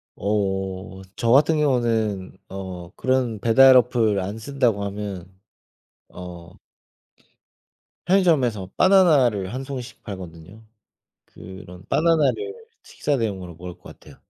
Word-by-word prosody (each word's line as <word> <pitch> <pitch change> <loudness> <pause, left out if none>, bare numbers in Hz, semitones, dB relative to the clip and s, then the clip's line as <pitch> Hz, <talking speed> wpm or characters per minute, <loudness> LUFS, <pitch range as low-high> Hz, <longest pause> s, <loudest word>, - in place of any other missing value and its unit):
어. 95 -2 -3
저 115 - 0
같은 150 +4 +4
경우는 115 -9 0
어 95 -3 -7
그런 130 -4 0
배달 130 +4 +6
어플 115 -4 +2
안 100 +4 -4
쓴다고 115 -4 0
하면 100 -3 -5 0.8
어 90 -1 -10 1.5
편의점에서 140 - +2
바나나를 140 - +4
1 130 +1 -4
송이씩 130 -4 -8
팔거든요. 90 +1 -10 0.6
그런 95 -1 -12
바나나를 170 - +1 0.3
식사 145 - -2
대용으로 95 -7 -4
먹을 90 +2 -9
것 - - -30
같아요. - - -14
110 Hz, 230 characters per minute, -23 LUFS, 95-130 Hz, 1.5 s, 배달